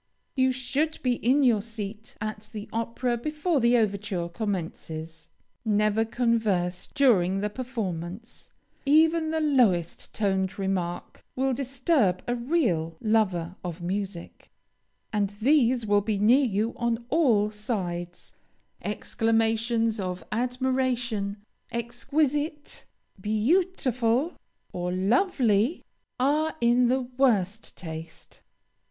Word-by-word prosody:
You 260 -1 +3
should 280 +5 -1
be 250 -2 +2
in 270 +4 +3
your 230 -5 +4
seat 220 -1 -7
at 215 0 -5
the 210 -1 -6
opera 230 +2 -1
before 300 +5 0
the 240 0 +4
overture 200 -5 -1
commences. 165 -4 -5 0.3
Never 215 0 +2
converse 220 -7 0
during 195 -10 +3
the 210 0 -1
performance. 210 -5 -5 0.3
Even 315 +3 +4
the 320 0 0
lowest 240 - +2
toned 190 -2 0
remark 185 -3 -3
will 265 +1 +1
disturb 255 - +1
a 240 - +1
real 235 - 0
lover 190 -6 +1
of 175 -1 -5
music, 190 -1 -5 0.6
and 205 -2 +1
these 250 -2 +3
will 205 -1 +3
be 210 0 -1
near 240 +7 +5
you 220 0 0
on 235 0 -1
all 235 -10 +3
sides. 180 -6 -4 0.5
Exclamations 225 +1 0
of 180 -1 -3
admiration, 245 -3 -1 0.3
"Exquisite!" 290 +6 -1 0.4
"Beautiful!" 255 - +1 0.4
or 180 0 -2
"Lovely!" 230 - +2 0.3
are 300 +4 +2
in 240 +1 +4
the 260 +2 +2
worst 240 -6 0
taste. 160 -2 -9
225 Hz, 105 wpm, -27 LUFS, 195-255 Hz, 0.6 s, near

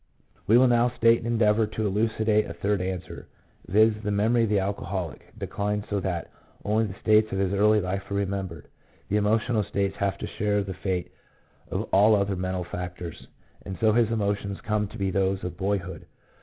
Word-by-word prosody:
We 115 - +6
will 130 +1 +6
now 120 0 +3
state 115 -1 +3
and 115 - -6
endeavour 110 -2 +3
to 110 0 -3
elucidate 110 +1 +1
a 85 - -7
third 100 +2 0
answer 90 -1 -5 0.2
— - - -29
viz., 110 +3 +4
the 105 - -3
memory 110 +3 +2
of - - -3
the 105 - +2
alcoholic 95 -4 -4
declines 105 0 -2
so 100 - +1
that 90 -3 -3 0.3
only 110 +2 +2
the 100 0 -8
states 110 0 +4
of 95 - -2
his 95 0 0
early 105 +2 +4
life 95 +1 -4
are 100 - -2
remembered. 95 -5 -3 0.4
The 105 - +2
emotional 110 +2 +1
states 100 0 -2
have 100 -1 -1
to - - -5
share 105 -1 0
the 95 -1 -5
fate 90 -1 -3 0.6
of - - -2
all 105 +3 +6
other 100 -1 0
mental 95 0 -2
factors, 90 -1 -7 0.4
and 95 - -6
so 110 -1 +4
his 115 -1 +3
emotions 100 -3 -1
come 105 -1 -1
to 110 - -11
be 95 -2 -1
those 95 0 0
of 90 -1 -4
boyhood. 95 -3 -3
100 Hz, 195 wpm, -26 LUFS, 95-110 Hz, 0.6 s, We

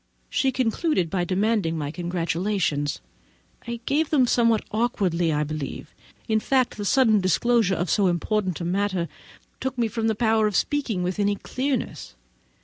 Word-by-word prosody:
She 270 - +2
concluded 250 - 0
by 180 -2 0
demanding 195 -2 0
my 145 -2 -3
congratulations. 170 -3 -1 0.7
I 235 0 -4
gave 300 +2 +1
them 275 -5 +4
somewhat 230 -2 +2
awkwardly, 190 -7 0
I 150 0 +1
believe; 150 -1 -6 0.3
for, 220 - -1
in 220 - +4
fact, 255 +1 +1
the 205 - -4
sudden 220 -3 +4
disclosure 200 +2 +2
of 175 +2 -1
so 200 +3 +2
important 185 0 0
a 170 - -4
matter 190 -1 0 0.5
took 265 -1 -3
from 245 - -1 0.2
me - - +3
the 220 - +1
power 220 -1 +2
of 210 - -3
speaking 250 -10 0
with 180 +2 -2
any 205 0 +2
clearness. 260 - -3
205 Hz, 160 wpm, -24 LUFS, 175-235 Hz, 0.7 s, them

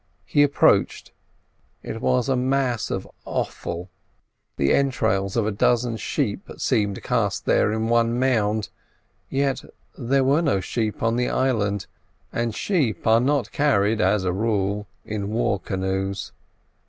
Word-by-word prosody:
He 145 - +2
approached; 145 -1 +3 0.7
it 115 - -6
was 125 -1 +1
a 135 - +2
mass 130 -2 0
of - - -3 0.2
offal; 85 +1 -4 0.7
the 70 - +2
entrails 110 -7 +1
of 115 - +2
a 110 - 0
dozen 120 +2 +1
sheep 110 - -2
seemed 100 -2 0
cast - - 0
here - - +3
in 110 +1 -1
one 115 0 +2
mound, 110 -5 +1 0.6
yet 135 -1 0 0.3
there 135 +2 +1
were 140 +5 +3
no 140 - +1
sheep 110 +4 -3
on 115 +1 +2
the 125 - +1
island, 105 -7 0 0.5
and 115 -2 -1
sheep 140 - 0
are 115 +1 +5
not 140 +1 0
carried 110 -7 +2
as 95 +1 +2
a 90 -1 0
rule 105 0 -1 0.2
in 105 -2 -3
war 110 -2 0
canoes. 95 +1 -3
115 Hz, 140 wpm, -23 LUFS, 100-130 Hz, 0.7 s, are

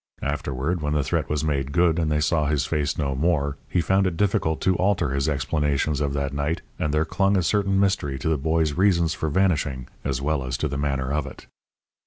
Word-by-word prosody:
Afterward, 70 +4 -2
when 75 0 -1
the 75 -2 +1
threat - - -1
was 75 0 -1
made 70 -3 -1
good 85 +2 +3
and 80 -2 0
they 75 - +2
saw 75 -1 +1
his 70 -2 +1
face 75 -2 -1
no 70 -3 -1
more, 70 -1 0
he 90 - +1
found 95 +3 +2
it 85 -3 -3
difficult 80 -5 +1
to 95 - +2
alter 90 -6 +1
his 70 +3 0
explanations 75 0 0
of 70 -1 0
that 70 0 -2
night, 70 +3 -2 0.2
and 75 - 0
there 75 +1 +1
clung 100 +3 +1
a 90 - +1
certain 100 +2 +1
mystery 95 -9 +1
to 65 - -4
the 80 - +2
boy's 80 +1 +1
reasons 85 -2 +2
for 80 - -2
vanishing 75 -7 0 0.2
as 65 -2 -1
well 75 0 -1
as 65 -1 -3
to 75 - -1
the 70 - -4
manner 70 -1 -1
of 75 -2 -1
it. - - -11
75 Hz, 225 wpm, -24 LUFS, 70-85 Hz, 0.2 s, good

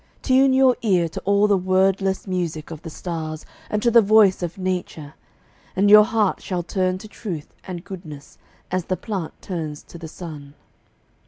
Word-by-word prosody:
Tune 265 0 +4
your 260 -1 +5
ear 185 -6 +2
To - - -6
all 200 +1 +4
the 205 -1 +4
wordless 190 +1 +1
music 170 -5 -3
of 160 -1 -8
the 165 - -8
stars 160 -1 -5 0.2
And 210 0 -1
to 235 - +3
the 235 0 +7
voice 210 -3 +5
of 175 0 -4
Nature, 180 -5 -4 0.6
and 200 +2 +3
your 210 0 +9
heart 215 -3 0
Shall 180 -2 -3
turn 185 +1 -1
to 200 - -11
truth 180 -8 -7
and 175 -2 -6
goodness 155 -7 -10 0.3
as 185 -2 -1
the 185 - -2
plant 195 -8 -5
Turns 155 -5 -5
to 170 - -12
the 165 - -7
sun. 150 -4 -9
185 Hz, 175 wpm, -22 LUFS, 165-205 Hz, 0.6 s, your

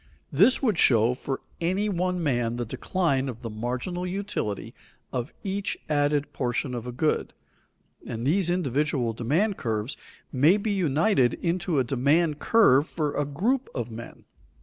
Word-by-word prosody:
_ - - -33 0.3
This 205 - +4
would 215 -9 +2
show 115 -1 +5
for 135 +1 -4 0.2
any 185 +5 +1
one 180 -2 -1
man 120 -5 0
the 120 0 -3
decline 135 - -1
of 120 -1 -8
the 115 - -4
marginal 125 +11 -3
utility 185 - -3 0.4
of 125 -2 -3
each 195 0 -2
added 145 -1 +1
portion 125 +1 -2
of 120 0 -5
a - - -3
good, 150 +5 0 0.7
and 115 +1 -4
these 175 +5 +2
individual 145 -7 0
demand 160 - 0
curves 110 +2 -2 0.4
may 150 +8 +4
be 210 +1 -2
united 160 - +2
into 175 -2 -1
a 130 - +4
demand 145 +5 +1
curve 155 - +4
for 150 -3 -2
a 145 - 0
group 225 - 0
of 120 -2 -3
men. 115 +1 -10
145 Hz, 155 wpm, -26 LUFS, 125-180 Hz, 0.7 s, show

